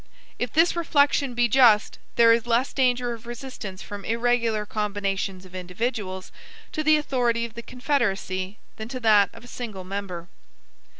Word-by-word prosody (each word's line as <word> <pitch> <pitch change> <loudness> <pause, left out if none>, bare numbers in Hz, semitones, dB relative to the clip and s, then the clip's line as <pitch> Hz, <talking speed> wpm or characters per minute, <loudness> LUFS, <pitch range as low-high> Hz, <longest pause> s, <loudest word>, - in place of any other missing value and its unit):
If 245 -2 -2
this 330 +2 +3
reflection 285 -5 +2
be 240 0 +3
just, 230 -3 +4 0.2
there 230 -1 +7
is 230 0 0
less 240 +3 +1
danger 250 -2 +1
of 230 0 -11
resistance 240 -6 -7
from 205 -1 -8
irregular 230 -1 +1
combinations 200 -3 -2
of 185 - -15
individuals 185 +1 -4 0.4
to 310 - -2
the 310 0 +5
authority 245 -5 0
of 230 - -9
the 235 - -7
Confederacy 205 -7 -2 0.2
than 220 - -6
to 255 +1 -5
that 210 -4 +5
of 230 - -14
a - - -12
single 220 -6 -6
member. 185 -3 -5
230 Hz, 160 wpm, -25 LUFS, 200-245 Hz, 0.4 s, there